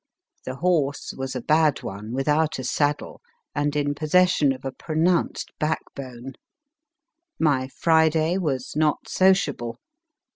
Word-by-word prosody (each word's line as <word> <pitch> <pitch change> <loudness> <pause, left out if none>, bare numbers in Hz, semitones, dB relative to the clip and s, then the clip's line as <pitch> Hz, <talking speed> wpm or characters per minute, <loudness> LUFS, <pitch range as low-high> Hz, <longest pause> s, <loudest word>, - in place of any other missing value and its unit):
The 130 - -4
horse 150 -4 0
was 135 0 -5
a 125 - -3
bad 155 -2 +2
one, 100 +3 -6
without 150 +4 +1
a 130 - -5
saddle, 145 +3 -1 0.3
and 145 0 -1
in 145 -1 0
possession 155 -1 +3
of 130 0 -6
a 135 - -2
pronounced 165 +5 0
backbone. 135 -4 -4 1.1
My 140 -5 +2
Friday 160 +3 +2
was 135 -8 -2
not 155 0 +1
sociable. 145 -11 +2
150 Hz, 120 wpm, -24 LUFS, 135-160 Hz, 1.1 s, possession